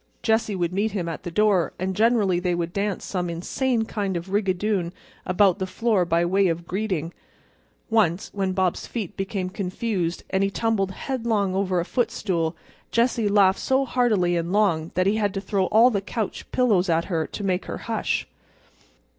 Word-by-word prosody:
Jessie 220 Hz, -2 st, +1 dB
would 175 Hz, -1 st, -1 dB
meet 205 Hz, +2 st, 0 dB
him 180 Hz, -5 st, -2 dB
at 165 Hz, -, -4 dB
the -, -, -5 dB
door, 195 Hz, -1 st, +2 dB
and 190 Hz, +1 st, -2 dB
generally 215 Hz, -5 st, +3 dB
they 180 Hz, -1 st, 0 dB
would 170 Hz, 0 st, -3 dB
dance 200 Hz, 0 st, -2 dB
some 180 Hz, -2 st, -2 dB
insane 225 Hz, +8 st, -1 dB
kind 200 Hz, -4 st, -2 dB
of 170 Hz, +2 st, -6 dB
a -, -, -10 dB
rigadoon 195 Hz, -2 st, 0 dB, 0.3 s
about 190 Hz, +1 st, +3 dB
the 190 Hz, -, -2 dB
floor 215 Hz, -3 st, +1 dB
by 170 Hz, 0 st, +2 dB
way 190 Hz, +2 st, +3 dB
of 170 Hz, 0 st, -2 dB
greeting. 185 Hz, -5 st, -2 dB, 0.7 s
Once 205 Hz, -6 st, +1 dB
when 195 Hz, -2 st, -1 dB
Bob's 185 Hz, -2 st, 0 dB
feet 215 Hz, -7 st, -5 dB
became 195 Hz, -1 st, -3 dB
confused 185 Hz, -1 st, -2 dB
and 190 Hz, 0 st, +2 dB
he 195 Hz, -, +2 dB
tumbled 205 Hz, -2 st, 0 dB
headlong 220 Hz, -3 st, -1 dB
over 190 Hz, -2 st, 0 dB
a 170 Hz, -, -1 dB
foot 245 Hz, +5 st, 0 dB
stool 170 Hz, -5 st, -1 dB, 0.3 s
Jessie 230 Hz, -2 st, +1 dB
laughed 195 Hz, -2 st, +4 dB
so 265 Hz, +1 st, +1 dB
heartily 215 Hz, -9 st, +2 dB
and 170 Hz, +1 st, -1 dB
long 180 Hz, -6 st, +2 dB
that 185 Hz, +1 st, +2 dB
he 205 Hz, +3 st, +2 dB
had 205 Hz, -2 st, 0 dB
to -, -, 0 dB
throw 195 Hz, -1 st, 0 dB
all 230 Hz, +4 st, +5 dB
the 200 Hz, -3 st, 0 dB
couch 215 Hz, +1 st, -4 dB
pillows 205 Hz, -8 st, +2 dB
at 165 Hz, 0 st, +2 dB
her 165 Hz, -4 st, -1 dB
to 205 Hz, -, -6 dB
make 185 Hz, -1 st, 0 dB
her -, -, -5 dB
hush. 225 Hz, -2 st, -2 dB
195 Hz, 190 wpm, -24 LUFS, 180-215 Hz, 0.7 s, all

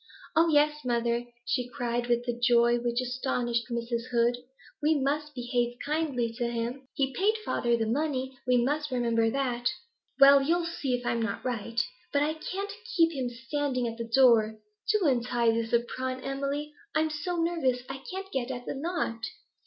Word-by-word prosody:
'Oh 330 Hz, +1 st, +5 dB
yes, 300 Hz, 0 st, +3 dB
mother,' 235 Hz, -1 st, 0 dB, 0.2 s
she 245 Hz, 0 st, -1 dB
cried, 240 Hz, -1 st, -2 dB
with 240 Hz, 0 st, +1 dB
a 240 Hz, -, +1 dB
joy 240 Hz, 0 st, +4 dB
which 240 Hz, 0 st, -1 dB
astonished 245 Hz, -2 st, -1 dB
Mrs. 235 Hz, 0 st, -3 dB
Heed, 240 Hz, 0 st, +2 dB, 0.4 s
'we 305 Hz, 0 st, +3 dB
must 295 Hz, +2 st, -1 dB
behave 245 Hz, -1 st, -1 dB
kindly 285 Hz, -6 st, 0 dB
to 240 Hz, -, +1 dB
him. 240 Hz, +3 st, -4 dB
He 270 Hz, -1 st, 0 dB
paid 425 Hz, +3 st, +2 dB
father 235 Hz, -1 st, +1 dB
the 225 Hz, -, 0 dB
money; 265 Hz, +1 st, -1 dB
we 250 Hz, 0 st, +4 dB
must 295 Hz, +5 st, 0 dB
remember 235 Hz, -3 st, +2 dB
that.' 245 Hz, -1 st, 0 dB, 0.5 s
'Well, 275 Hz, 0 st, +9 dB
you'll 335 Hz, +5 st, +1 dB
see 285 Hz, -6 st, -1 dB
if 245 Hz, 0 st, -6 dB
I'm 235 Hz, -, 0 dB
net 215 Hz, +1 st, -3 dB
right. 235 Hz, -2 st, -2 dB, 0.3 s
But 285 Hz, 0 st, +3 dB
I 305 Hz, +1 st, +1 dB
can't 390 Hz, +5 st, -5 dB, 0.2 s
keep 330 Hz, -1 st, +5 dB
him 260 Hz, -5 st, -2 dB
standing 255 Hz, +1 st, -2 dB
at 230 Hz, 0 st, -6 dB
the 230 Hz, 0 st, -4 dB
door. 230 Hz, -4 st, +5 dB, 0.3 s
Do 420 Hz, -4 st, +2 dB
untie 240 Hz, -2 st, +2 dB
this 225 Hz, 0 st, -1 dB
apron, 255 Hz, +2 st, -1 dB
Emily; 280 Hz, +2 st, -3 dB, 0.2 s
I'm 315 Hz, 0 st, +2 dB
so 305 Hz, +4 st, -3 dB
nervous, 330 Hz, -8 st, 0 dB
I 270 Hz, -, -6 dB
can't 385 Hz, +1 st, -6 dB
get 255 Hz, -2 st, -2 dB
at 245 Hz, -1 st, -5 dB
the -, -, -3 dB
knot. 285 Hz, -5 st, -2 dB
250 Hz, 175 wpm, -29 LUFS, 235-295 Hz, 0.5 s, Well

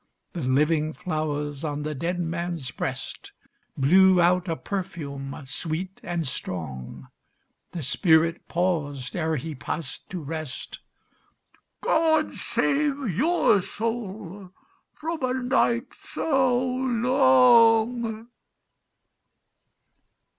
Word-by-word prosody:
The 170 Hz, -, -4 dB
living 150 Hz, +4 st, +2 dB
flowers 150 Hz, -4 st, -3 dB
on 150 Hz, -1 st, -3 dB
the 155 Hz, 0 st, -3 dB
dead 170 Hz, +6 st, -2 dB
man's 170 Hz, -5 st, -3 dB
breast -, -, -5 dB, 0.4 s
Blew 185 Hz, +6 st, +5 dB
out 180 Hz, +1 st, +3 dB
a 165 Hz, -, -1 dB
perfume 145 Hz, -8 st, -5 dB
sweet 170 Hz, +7 st, -4 dB
and 170 Hz, -2 st, -3 dB
strong. 80 Hz, -, -5 dB, 0.6 s
The 170 Hz, -4 st, -5 dB
spirit 165 Hz, +4 st, +2 dB
paused 145 Hz, -8 st, -1 dB
ere 160 Hz, -2 st, 0 dB
he 155 Hz, +3 st, -4 dB
passed 150 Hz, +3 st, -5 dB
to 185 Hz, -, -4 dB
rest— 155 Hz, -2 st, -6 dB, 1.0 s
"God 315 Hz, -1 st, +2 dB
save 280 Hz, -3 st, 0 dB
your 295 Hz, -, +3 dB
soul 205 Hz, -3 st, -5 dB, 0.5 s
from 325 Hz, 0 st, -4 dB
a 255 Hz, 0 st, 0 dB
night 250 Hz, -1 st, +1 dB, 0.2 s
so 265 Hz, -5 st, +2 dB
long." 245 Hz, -3 st, +3 dB
180 Hz, 95 wpm, -25 LUFS, 155-240 Hz, 1.0 s, Blew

